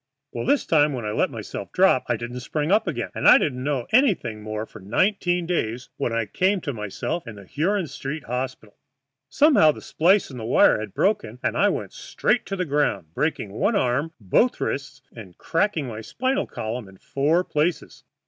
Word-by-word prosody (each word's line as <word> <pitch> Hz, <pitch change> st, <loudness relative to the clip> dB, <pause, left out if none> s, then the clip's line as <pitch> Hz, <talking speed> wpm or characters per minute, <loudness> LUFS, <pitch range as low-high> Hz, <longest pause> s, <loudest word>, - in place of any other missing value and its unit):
Well, 115 Hz, -, -4 dB
this 285 Hz, -, +2 dB
time 150 Hz, -2 st, +3 dB
when 120 Hz, -4 st, -4 dB
I 105 Hz, -, -2 dB
let -, -, +1 dB
myself -, -, -7 dB
drop -, -, +3 dB
I 120 Hz, -, +1 dB
didn't 120 Hz, +2 st, -6 dB
spring 150 Hz, +5 st, -2 dB
up 210 Hz, 0 st, +3 dB
again, 125 Hz, -9 st, -3 dB
and -, -, 0 dB
I -, -, +10 dB
didn't 125 Hz, -3 st, -1 dB
know 140 Hz, -4 st, -1 dB
anything 185 Hz, -, +2 dB
more 110 Hz, 0 st, -4 dB
for 110 Hz, -, -13 dB
nineteen 175 Hz, -, 0 dB
days, 125 Hz, -8 st, -2 dB
when -, -, -1 dB
I 115 Hz, -1 st, 0 dB
came 190 Hz, -, +1 dB
to 145 Hz, -, -3 dB
myself 105 Hz, -, -4 dB
in 115 Hz, -, -7 dB
the 100 Hz, -1 st, -12 dB
Huron 185 Hz, -, 0 dB
Street 145 Hz, 0 st, -6 dB
Hospital. 125 Hz, -3 st, -5 dB, 0.5 s
Somehow 285 Hz, -, +5 dB
that -, -, -11 dB
splice 185 Hz, +1 st, +2 dB
in 130 Hz, -, -8 dB
the -, -, -6 dB
wire 115 Hz, -1 st, +4 dB
had 105 Hz, -2 st, -7 dB
broken, 185 Hz, -, 0 dB
and -, -, 0 dB
I -, -, +4 dB
went -, -, -4 dB
straight -, -, -1 dB
to 195 Hz, -, -3 dB
the 185 Hz, -1 st, -2 dB
ground, 110 Hz, -, -1 dB
breaking 140 Hz, -, -2 dB
one 205 Hz, -, 0 dB
arm, 140 Hz, 0 st, 0 dB
both 110 Hz, -, +2 dB
wrists, 135 Hz, -2 st, -4 dB
and 100 Hz, -7 st, -11 dB
cracking 165 Hz, -3 st, 0 dB
my 110 Hz, -3 st, -6 dB
spinal 260 Hz, -, -1 dB
column 110 Hz, 0 st, -5 dB
in 95 Hz, 0 st, -16 dB
four 150 Hz, -, +1 dB
places. 160 Hz, +1 st, -2 dB
135 Hz, 195 wpm, -24 LUFS, 115-175 Hz, 0.5 s, I